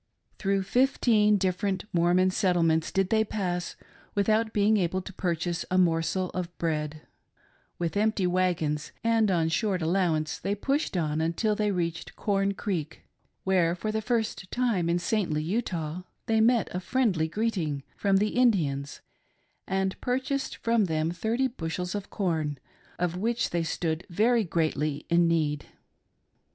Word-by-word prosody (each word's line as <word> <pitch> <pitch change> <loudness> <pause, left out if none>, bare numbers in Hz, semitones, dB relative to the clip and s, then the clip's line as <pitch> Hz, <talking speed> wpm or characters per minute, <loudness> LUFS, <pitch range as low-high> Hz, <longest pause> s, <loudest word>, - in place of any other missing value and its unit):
Through 195 -1 +1
fifteen 215 -2 +3
different 190 0 -1
Mormon 180 +2 +3
settlements 170 -5 +2
did 195 -1 0
they 220 -1 +4
pass, 180 -5 -3 0.4
without 215 +2 +2
being 210 +1 +3
able 185 -1 0
to 190 - -9
purchase 170 -1 -1
a 185 - +1
morsel 175 +1 +1
of 175 -1 -5
bread, 155 -2 -2 0.7
With 170 +1 -2
empty 210 -2 +1
wagons 175 -5 0
and 225 -2 +3
on 170 -4 +2
short 195 +2 0
allowance, 160 -2 0
they 200 - -1
pushed 275 - -1
on 155 -2 0
until 170 +7 +1
they 210 0 +1
reached 170 -4 -3
Corn 195 -1 0
Creek, 165 -8 -4 0.4
where, 180 -3 +2
for 215 +4 -3
the 220 0 -1
first 220 -4 -1
time 225 -9 +1
in 170 - +2
saintly 175 -4 0
Utah, 175 -4 -2 0.2
they 220 -1 +2
met 230 -1 +3
a 180 - -2
friendly 190 -7 +1
greeting 165 -7 -1
from 195 -1 +2
the 210 +2 +2
Indians 160 - +1 0.7
and 190 0 -1
purchased 265 +2 -1
from 230 -2 +2
them 160 -1 0
thirty 225 +8 0
bushels 180 -6 -4
of 205 -2 -5
corn, 160 -7 -1 0.4
of 175 0 -1
which 230 +4 0
they 170 - 0
stood 165 0 -2
very 225 +6 +3
greatly 155 -4 -1
in 170 0 +5
need. 155 -3 0
185 Hz, 145 wpm, -27 LUFS, 165-215 Hz, 0.7 s, in